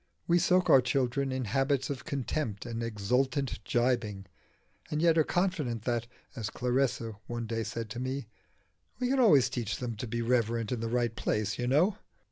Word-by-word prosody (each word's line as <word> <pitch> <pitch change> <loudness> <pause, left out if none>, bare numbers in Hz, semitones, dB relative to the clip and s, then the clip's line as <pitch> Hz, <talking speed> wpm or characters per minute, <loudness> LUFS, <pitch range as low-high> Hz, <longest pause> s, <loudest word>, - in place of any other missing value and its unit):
We 175 +1 +4
soak 180 +1 +3
our 135 - +7
children 135 +1 0
in 130 -1 -2
habits 135 +5 +1
of 130 -2 -6
contempt 130 -6 -3
and 115 0 -4
exultant 125 +3 -1
gibing, 120 -4 0 0.6
and 150 - -1
yet 165 0 +4
are 160 - +5
confident 155 - -1
that 120 -1 -1 0.3
as 110 -2 -3
Clarissa 125 -4 -1
one 120 -1 -3
day 115 0 -2
said 115 0 -4
to 120 - -5
me 130 +1 -3 0.7
"We 250 -1 0
can 270 0 +2
always 150 - +6
teach 115 -2 -3
them 120 -3 -4
to 120 - -4
be 115 +1 -2
reverent 115 -2 +1
in 125 - -1
the 115 0 -2
right 120 -1 0
place, 105 -1 -1
you 120 - -1
know." 160 +10 +3
125 Hz, 180 wpm, -30 LUFS, 115-140 Hz, 0.7 s, our